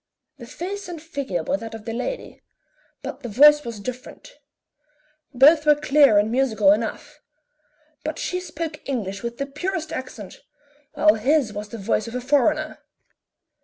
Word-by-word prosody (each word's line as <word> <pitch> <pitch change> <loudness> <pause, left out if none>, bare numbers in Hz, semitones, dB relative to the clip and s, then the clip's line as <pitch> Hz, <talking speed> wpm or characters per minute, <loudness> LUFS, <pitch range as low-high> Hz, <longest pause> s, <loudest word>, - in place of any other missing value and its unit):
The 235 - -10
face 385 +9 -6
and 345 -2 -7
figure 280 - -4
were 285 - 0
that 225 -2 -8
of 220 -1 -11
the 225 - -4
lady, - - -5 0.6
but - - -6
the 245 -4 -7
voice 295 +7 +6
was 230 -4 -7
different; 255 - -8 1.0
both 295 +4 +6
were 300 -1 +5
clear 285 -5 +4
and 210 +2 +2
musical 225 -6 +3
enough, 285 +8 -3 0.8
but 310 0 -4
she 360 - -2
spoke 325 -3 -6
English 200 -7 -3
with 235 0 -5
the 275 - -2
purest 320 +3 -4
accent, 245 -7 -8 0.5
while 210 - +5
his 250 +1 +1
was 210 0 -6
the 230 - -7
voice 215 +1 -1
of 230 - -7
a 250 - -2
foreigner. 295 +4 +1
270 Hz, 160 wpm, -23 LUFS, 225-300 Hz, 1.0 s, voice